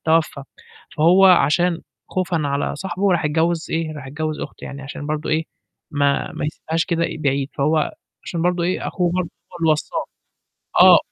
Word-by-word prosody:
توفّى، 160 -3 +2 0.5
فهو 180 +5 +6
عشان 175 0 +4 0.3
خوفًا 180 -2 0
على 140 0 -1
صاحبه 190 +3 0
راح 175 - +1
اتجوِّز 160 +2 +1
إيه، 160 -1 -1
راح 140 -3 -8
اتجوِّز 155 +2 -3
أخته - - -7
يعني 140 0 -7
عشان 145 +1 -7
برضه 155 0 -2
إيه، 160 +1 +1 0.5
ما 145 -1 +1
ما - - -4
يسبهاش 160 +2 -2
كده 170 -1 0 0.2
بعيد، 140 -1 0
فهو 150 +2 +2 0.3
عشان 170 -2 -3
برضه 180 0 +1
إيه، 180 +2 -1
أخوه 175 -2 0
برضه 180 -1 -1 0.2
هو 175 - -8
اللي 165 -1 +3
وصّاه، 155 - -2 0.8
آه. - - +9
160 Hz, 165 wpm, -21 LUFS, 150-175 Hz, 0.8 s, آه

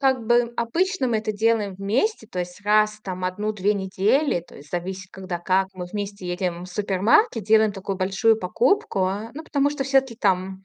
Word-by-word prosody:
Как 265 -4 +1
бы, 240 0 +3
обычно 330 - 0
мы 225 - +1
это 215 0 -2
делаем 215 -2 +1
вместе. 220 - -1
То 185 - -7
есть 180 +2 -5
раз 215 0 +3
там 185 -1 -5
в - - -3
1-2 205 +2 0
недели, 200 - +1
то 170 - -16
есть 145 +1 -14
зависит, 185 +2 -4
когда 185 -2 -5
как, 190 +2 +1
мы 180 - -5
вместе 200 -1 -5
едем 175 -1 -3
в - - -8
супермаркет, 210 - +2
делаем 220 0 +4
такую 195 0 -4
большую 195 +4 +2
покупку, 255 - +1
э. 210 +4 -4
Ну, 315 - -6
потому 285 -2 +1
что 290 -2 -3
всё-таки 265 -3 +2
там, 190 -2 0
205 Hz, 190 wpm, -23 LUFS, 185-235 Hz, -, делаем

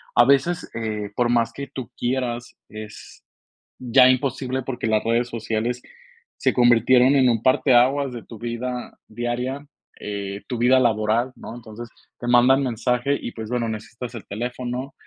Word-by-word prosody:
A 120 - +7
veces, 140 +6 +2
eh, 105 -3 -4
por 120 -1 +1
más 115 -1 +1
que 140 0 -6
tú 130 -3 -6
quieras, 120 -1 -2
es 110 0 -11 0.6
ya 125 +1 +5
imposible, 130 0 0
porque 125 -3 -4
las 110 -1 +1
redes 115 +1 +1
sociales 115 +1 -3 0.6
se - - +1
convirtieron 125 +2 +5
en 130 -2 +5
un 115 -2 +1
parteaguas 130 +1 +3
de 120 - -7
tu 115 - -11
vida 120 +1 -5
diaria, 120 +5 -3 0.3
eh, 100 -1 -5
tu 125 - -3
vida 125 +3 +4
laboral, 115 +1 +1
¿no? 115 - -9
Entonces, 115 0 -10 0.3
te 120 - -6
mandan 125 +3 +5
mensaje 125 +2 0
y, 120 - -6
pues, 110 -1 -7
bueno, 120 -2 -1
necesitas 115 +3 -7
el 115 - -8
teléfono, 125 +4 -4
120 Hz, 155 wpm, -23 LUFS, 115-130 Hz, 0.6 s, A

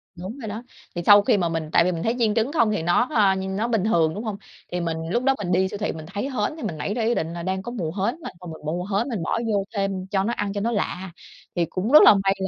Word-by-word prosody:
Đúng 190 +9 -7
rồi 225 - -6
đó. 215 +3 -6 0.3
Thì 175 - -2
sau 205 0 +8
khi 205 0 +2
mà 175 -3 0
mình 165 -2 -3
tại - - +5
vì 180 - +1
mình 165 -2 -4
thấy 225 +2 0
chiên 220 -3 +2
trứng 230 +4 +1
không 235 -9 +2
thì 210 - -1
nó, 175 +9 +2
ơ, 200 -3 +4
nó 190 +4 -2
bình 225 -5 +1
thường, 165 -7 +2
đúng 210 +6 -5
hông? 210 -3 -4 0.3
Thì 180 - -2
mình 165 -1 -2
lúc 240 +6 0
đó 270 - +4
thì - - -3
mình 175 - -2
đi 185 +1 +3
siêu 205 - -6
thị 210 - -2
mình 160 -1 -8
thấy 205 - -2
hến 265 +1 -2
thì 315 - -8
mình 180 -8 -3
nảy 175 +7 -2
ra 230 0 -1
ý 235 +2 +2
định 160 +1 -2
là 170 0 -6
đang 190 +1 -2
có 240 - -6
mùa 180 -10 -3
hến 200 +6 -1
mà, - - -6
thôi 180 - -8
mình 160 - -12
mua 175 +4 -2
hến 210 +6 -1
mình 205 -9 -3
bỏ 230 - -1
vô 200 -1 +1
thêm 195 -2 -2
cho 195 -1 0
nó 235 - -1
ăn 205 -3 -2
cho 205 - -2
nó 235 - 0
lạ. 190 -4 -3 0.4
Thì 175 -1 +2
cũng 185 +8 -3
rất 305 - +9
là - - +9
may 195 - +3
195 Hz, 315 wpm, -24 LUFS, 175-225 Hz, 0.4 s, rất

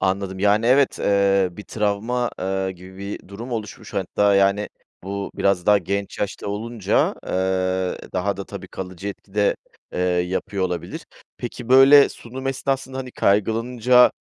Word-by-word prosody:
Anladım. 95 0 -1
Yani, 105 +3 +3
evet, 135 +2 +4
eee, 100 -1 +3
bir 105 +4 -9
travma, 115 +3 -1
eee, 95 0 -1
gibi 95 +1 -13
bir 100 -1 -7
durum 115 +6 -7
oluşmuş 110 -3 -6
hatta, 100 +1 +2
yani, 100 +1 +3 0.4
bu 100 +1 -4
biraz 95 -3 +1
daha 105 -1 +6
genç 100 +2 -3
yaşta 100 - -3
olunca, 110 0 0
eee, 95 0 0
daha 95 +1 -1
da 100 - -5
tabii - - -9
kalıcı 95 +1 -6
etki 100 0 -10
de, 105 -1 +2 0.4
eee, - - -2
yapıyor 90 +2 0
olabilir. 90 -2 -4 0.3
Peki, 120 0 -7
böyle, 135 +2 +8
sunum 130 +3 -8
esnasında, 135 0 -2
hani, 130 -1 -5
kaygılanınca, 115 +4 +3
100 Hz, 145 wpm, -22 LUFS, 95-115 Hz, 0.4 s, böyle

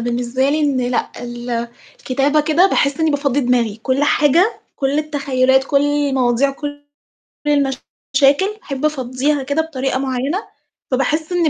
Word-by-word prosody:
بالنسبة 240 +3 -1
لي 305 +2 +1
إن 280 -4 +1
لأ، 245 0 -1
ال 240 -1 -4 0.3
الكتابة 285 - +1
كده 315 +5 +3
باحس 290 -5 +1
إنّي 320 -1 +3
بافضّي 285 -1 0
دماغي، 240 -4 +1
كل 260 +3 0
حاجة، 315 - +3 0.2
كل 275 +1 0
التخيُّلات، 265 -3 +1
كل 280 0 +2
المواضيع، 275 -3 +1
كل 290 +1 -7 0.7
المشاكل 280 +4 +1
باحب 275 - -4
أفضّيها 275 0 -1
كده 285 +4 0
بطريقة 270 -4 -2
معيّنة، 270 - -2 0.4
فباحس 300 +6 0
إنّي 345 -3 +2
275 Hz, 135 wpm, -18 LUFS, 255-295 Hz, 0.7 s, كده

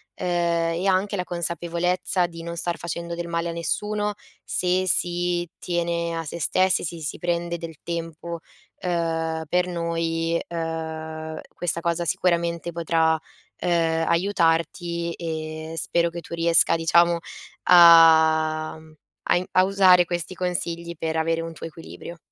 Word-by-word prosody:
uhm, - - -5
e 170 +1 0
anche 195 +2 +1
la 180 - -1
consapevolezza 175 +2 -1
di 165 -1 -10
non 170 0 -5
star 170 0 -2
facendo 170 0 -5
del 170 0 -5
male 170 0 -2
a - - -2
nessuno, 210 +5 -2 0.3
se 185 +1 +2
si 175 0 +2
tiene 170 -1 -2
a 165 - -3
se 165 +2 -7
stessi, 185 +4 +2
si 170 0 -5
si 150 - -4
prende 170 0 -2
del 165 -2 -8
tempo, 170 0 -5 0.4
uhm, 165 -2 -1
per 180 0 +2
noi, 165 -1 -1
uhm, 160 -1 -5
questa 170 -1 -1
cosa 170 0 -1
sicuramente 170 +1 0
potrà, 165 -1 +1 0.4
uhm, 165 -2 +1
aiutarti 170 -1 0
e 160 -1 -5
spero 170 +2 +1
che 170 0 -6
tu 165 - -11
riesca 165 0 +4
diciamo 170 +1 +3 0.5
a 160 -2 +6
mhmm, 160 0 -17 0.4
a - - +5
in 180 - -2
a 185 - +5
usare 185 -2 +5
questi 175 +1 -4
consigli 170 -1 -3
per 160 0 -3
avere 165 +1 0
un 165 0 -6
tuo 160 - -9
equilibrio. 165 +1 -10
170 Hz, 145 wpm, -24 LUFS, 165-175 Hz, 0.5 s, a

